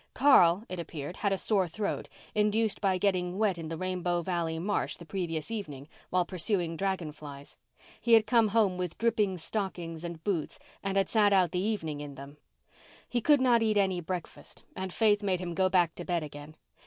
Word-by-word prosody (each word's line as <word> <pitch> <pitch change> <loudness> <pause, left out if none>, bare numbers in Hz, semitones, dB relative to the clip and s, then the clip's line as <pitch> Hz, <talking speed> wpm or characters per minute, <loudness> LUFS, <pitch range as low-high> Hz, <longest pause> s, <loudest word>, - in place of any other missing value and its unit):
Carl, 195 -9 +6
it 185 - -6
appeared, 165 0 -6
had 200 - 0
a 195 - +1
sore 195 -2 +1
throat, 200 +5 -3 0.2
induced 210 0 +1
by 190 -2 +2
getting 185 -2 0
wet 200 -5 +1
in 160 - -5
the 165 0 -5
Rainbow 180 -1 -1
Valley 170 -2 -1
marsh 195 +5 -1
the 170 - -11
previous 165 -2 -3
evening 150 -11 -6 0.2
while 180 -1 +2
pursuing 175 -1 -1
dragon 190 -3 -2
flies. 145 -2 -11 0.4
He 235 - +2
had 225 -1 +7
come 225 0 +4
home 205 -4 +2
with 180 -2 -3
dripping 210 -5 +1
stockings 175 -3 -4
and 170 -2 -7
boots 180 -7 -2 0.2
and 195 0 -2
had 195 -1 +3
sat 210 -3 +3
out 185 -3 +4
the 180 - -1
evening 165 -8 -2
in 145 -1 -8
them. 140 +2 -11 0.7
He 240 - -1
could 290 +2 +4
not 245 -3 +4
eat 215 -2 +2
any 190 -3 +2
breakfast 175 0 -7
and 190 0 -4
Faith 210 +1 +3
made 190 -3 0
him 175 -1 -4
go 185 +2 +2
back 175 -3 +3
to 175 - -7
bed 175 -2 -1
again. 145 +1 -10
185 Hz, 195 wpm, -29 LUFS, 165-205 Hz, 0.7 s, had